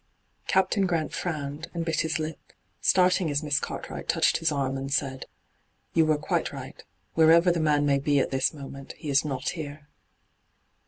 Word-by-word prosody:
Captain 190 0 +2
Grant 165 -3 -1
frowned, 150 -2 -4
and 170 -1 -2
bit 165 -1 0
his 160 - -1
lip, 155 0 -6 0.3
starting 180 -2 +3
as 145 +1 -1
Miss 150 -1 +1
Cartwright - - -6
touched - - +3
his 165 -1 0
arm 135 -2 -1
and 135 +1 -4
said: 135 -2 -1 0.3
' - - -44
You 160 -1 +4
were 155 -1 +3
quite 150 - -1
right. - - -9 0.3
Wherever 165 +2 +6
the 170 - 0
man 150 -2 +2
may 140 -1 +3
be 145 +1 +1
at - - 0
this 135 -1 +2
moment, 135 -2 -9
he 150 -4 -6
is 140 - +4
not 135 -3 -2
here.' 150 -2 -7
150 Hz, 180 wpm, -27 LUFS, 140-165 Hz, 0.3 s, Wherever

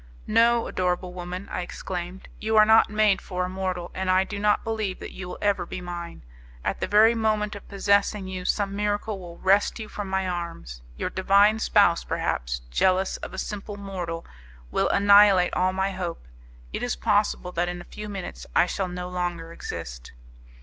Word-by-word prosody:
"No, 230 +1 +4
adorable 180 0 -1
woman," 180 +2 -6
I - - -2
exclaimed, 180 +1 -6
"you 220 +1 0
are 215 - +8
not 220 +1 +6
made 210 -2 +3
for 180 -1 -3
a - - -4
mortal, 185 -2 -3
and 185 0 -2
I 185 +1 +4
do 200 +1 -6
not 210 0 +2
believe 215 -4 -2
that - - -7
you 190 - -7
will - - -6
ever 205 -1 +2
be - - -6
mine. 175 - -7 0.4
At - - -1
the - - -1
very 215 +3 +6
moment 215 -2 0
of 205 - -11
possessing 200 0 +1
you 185 -1 -5
some 200 +1 0
miracle 205 0 -1
will 170 -2 -10
wrest 195 +2 +3
you 220 -2 -6
from 205 -1 -6
my 190 0 0
arms. 170 - -5 0.2
Your - - -3
divine 200 +3 +4
spouse, 200 -6 +3
perhaps, - - -2
jealous 185 - +2
of - - -8
a 190 - -8
simple 205 +1 -5
mortal, 180 -4 -5 0.5
will - - +1
annihilate 200 -2 +6
all 185 +1 +2
my 190 +1 -1
hope. 180 -3 -5 0.5
It - - -3
is 245 0 -1
possible 205 -4 +1
that 175 0 -1
in 175 0 -5
a - - -8
few 210 0 -6
minutes 195 -3 -7
I - - +6
shall 185 +1 -2
no 180 0 -5
longer 175 -2 -3
exist." - - -7
190 Hz, 190 wpm, -25 LUFS, 180-205 Hz, 0.5 s, are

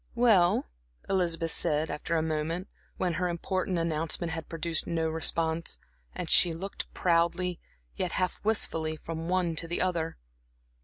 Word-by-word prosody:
"Well," 205 - +4 0.4
Elizabeth 170 -4 +1
said, 155 0 +1
after 165 +2 -2
a 160 - +1
moment, 160 +3 -2 0.3
when 180 -2 0
her 180 - +1
important 185 +1 -1
announcement 165 0 -1
had 165 -1 -5
produced 165 0 -1
no 165 -1 0
response, 160 +1 +1 0.4
and - - -4
she 175 - +7
looked 190 +5 -6
proudly, 175 +1 +1 0.4
yet - - -2
half 185 -1 -1
wistfully, 165 -7 +1
from 165 +2 -6
one 180 -3 +1
to 165 - +1
the 170 - -3
other. 170 -3 -1
170 Hz, 145 wpm, -29 LUFS, 160-180 Hz, 0.4 s, she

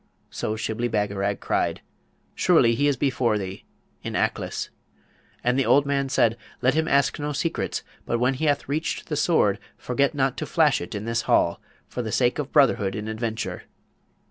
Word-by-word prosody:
So 110 - -2
Shibli 110 +2 -2
Bagarag 100 -1 -1
cried, - - -1 0.5
'Surely 135 -10 +4
he 145 +5 +2
is 140 -2 +1
before 120 -4 +1
thee, 95 -1 -6 0.4
in - - -5
Aklis.' - - -1 0.7
And 125 +2 +2
the 135 - +2
old 145 0 +5
man 140 -1 0
said, 120 -3 +2 0.2
'Let 130 +2 +3
him 160 +1 +1
ask 140 +1 +2
no 150 0 -2
secrets; 165 +4 -2 0.2
but 120 - +1
when 125 +3 +2
he 135 +4 -2
hath 145 -1 +1
reached 155 +4 -2
the 150 - -1
Sword 105 - +2 0.2
forget 140 +4 0
not 135 -2 +1
to - - -4
flash 155 -4 +3
it 85 - -6
in 105 +1 -4
this 115 0 -2
hall, - - +3 0.3
for 125 - -4
the 110 -2 -4
sake 125 +3 +2
of 145 -2 -3
brotherhood 115 -9 +3
in 105 0 -4
adventure.' 110 0 -4
125 Hz, 180 wpm, -25 LUFS, 110-140 Hz, 0.7 s, old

